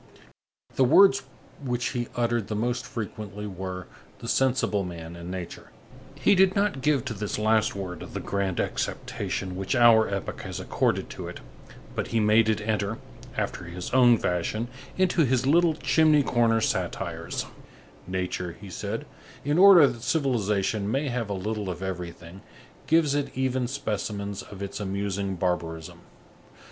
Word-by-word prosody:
The 135 - +5
words 135 +1 +6 0.4
which 125 -2 -1
he 120 -1 -3
uttered 120 -3 0
the 105 - -3
most 120 +3 -1
frequently 105 -2 -6
were: 95 -2 -5 0.3
the 115 - -9
sensible 125 -6 +2
man, 85 -2 -7
and 85 +1 -8
nature. 90 -2 -7 0.5
He - - +3
did 190 -1 +4
not 200 -9 +1
give 140 -2 +2
to 125 - -3
this 105 -1 -3
last 110 0 +2
word 90 -4 -5
the - - -6
grand 100 -2 -2
acceptation 90 -1 -3
which 95 +7 -2
our 115 -3 +6
epoch 100 -1 -4
has - - -6
accorded - - 0
to - - -6
it, - - -8 0.5
but - - -2
he 115 - 0
made 110 +1 +4
it 110 -1 +1
enter, 105 0 0 0.4
after - - -2
his 85 +1 -6
own 120 -2 +6
fashion, 110 +6 -1 0.3
into 185 -2 +3
his 130 -1 +1
little 165 +3 +4
chimney 155 -2 +4
corner 115 -3 +2
satires: - - -2 0.6
"Nature," 90 -1 -3
he 100 -2 -10
said, - - -4 0.4
"in 145 +4 +2
order 190 -5 +9
that 120 -4 -2
civilization 105 - 0
may 135 +5 0
have 120 -3 -2
a - - -1
little 105 +1 -3
of 90 +1 -5
everything, 90 -1 -6 0.5
gives 160 -3 +4
it 145 -3 -2
even 130 -1 0
specimens 105 -6 -3
of 100 -1 -9
its 100 - -5
amusing 100 -1 -2
barbarism. 85 -2 -3
110 Hz, 155 wpm, -26 LUFS, 95-130 Hz, 0.6 s, order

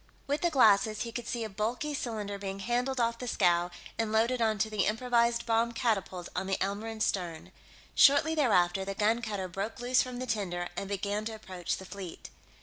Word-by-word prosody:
With 285 +2 -1
the 345 - +3
glasses, 215 -6 +4
he 230 - -6
could 235 0 -5
see 235 -2 -2
a - - -2
bulky 225 +8 -2
cylinder 210 -7 -4
being 195 -1 -4
handled 245 +5 -1
off 230 0 +1
the 250 - -5
scow 175 -5 +2 0.3
and 225 -1 0
loaded 235 +3 +2
onto 220 -1 +2
the 215 -3 0
improvised 235 +1 +2
bomb 230 +1 +2
catapult 195 -6 -1
on 190 - -2
the 195 - 0
Elmoran's 215 +3 -1
stern. 175 -4 -3 0.4
Shortly 285 +3 +6
thereafter, 195 - +3
the 195 0 -4
gun 220 +3 +2
cutter 205 -4 -3
broke 195 +6 -4
loose 250 +1 +3
from 250 -1 -4
the 255 - -3
tender 185 -7 -2
and 195 +2 -4
began 200 +1 -2
to 225 0 -4
approach 185 -4 -4
the 190 - -9
fleet. 190 -3 -8
220 Hz, 195 wpm, -30 LUFS, 195-235 Hz, 0.4 s, Shortly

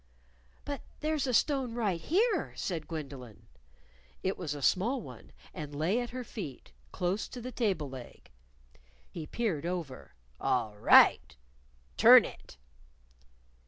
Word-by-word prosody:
"But 285 -1 -4 0.2
there's 305 -2 0
a - - 0
stone 265 -5 +1
right 200 -8 -1
here," 400 - +1
said 170 -5 -4
Gwendolyn. 140 -8 -8 0.8
It 190 +1 0
was 155 -5 -4
a 145 - -7
small 230 - +2
one, 125 - -12 0.2
and 145 -1 -7
lay 170 +10 +1
at 240 - -5
her 255 +1 -5
feet, 185 - -8 0.2
close 185 +3 -2
to 250 - -9
the 250 +2 -6
table 195 - -1
leg. 130 -2 -11 0.8
He 160 -3 -7
peered 175 -9 -2
over. 170 -8 -5 0.2
"All 120 -6 0
right! 105 - +5 0.6
Turn - - +9
it!" - - -11
180 Hz, 130 wpm, -30 LUFS, -, 0.8 s, Turn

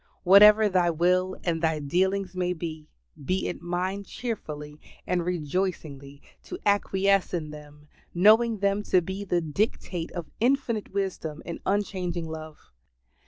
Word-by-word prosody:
Whatever 210 +3 +7
Thy 180 -3 +2
will 180 +3 +1
and 165 -2 -1
Thy 160 -1 +1
dealings 185 +5 0
may 180 0 0
be, 160 -2 -7 0.4
be 185 +7 -1
it - - -5
mine 180 +3 -2
cheerfully 150 -11 -6 0.3
and 180 -1 0
rejoicingly 155 -4 -3 0.2
to 360 - -6
acquiesce 195 -2 +2
in 155 -3 -4
them, 150 0 -13 0.2
knowing 220 +5 +4
them 200 +1 +1
to 190 -3 +3
be 190 +3 -5
the 175 -3 0
dictate 170 0 -2
of 175 -2 -5
infinite 240 -3 0
wisdom 190 -6 -3
and 170 - -6
unchanging 185 -4 -1
love. 155 - -9
180 Hz, 135 wpm, -26 LUFS, 160-200 Hz, 0.4 s, Whatever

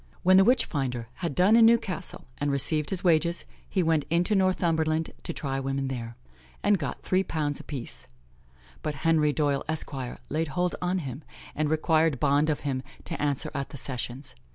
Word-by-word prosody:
"When 185 +1 +6
the 195 - +8
witch 245 +4 +4
finder 125 -6 -3
had 170 -6 -3
done 195 +5 +5
in 230 -1 +8
Newcastle, 200 -5 0
and 145 - 0
received 145 +2 +2
his 190 -2 -3
wages, 170 -1 +2 0.2
he 185 - +1
went 160 -2 +2
into 175 +6 +2
Northumberland 165 -5 +1
to - - -4
try 135 -4 -2
women 135 0 -2
there, 115 -3 -5 0.5
and 205 -2 +3
got - - -4
three 185 +1 +2
pounds 150 -5 -2
a - - -9
piece; 135 -5 -5 0.7
but 150 -1 -3
Henry 155 -2 +4
Doyle, 145 -2 0
Esq., 155 -1 -1 0.3
laid 160 +1 -1
hold 180 +3 -1
on 180 +1 0
him, 140 -3 -5 0.3
and 155 0 0
required 155 -2 +2
bond 145 +3 +3
of 150 - 0
him 135 -3 -2 0.2
to - - -5
answer 145 -2 0
at 140 -2 -3
the - - -8
Sessions. 130 0 -4
155 Hz, 180 wpm, -27 LUFS, 140-175 Hz, 0.7 s, the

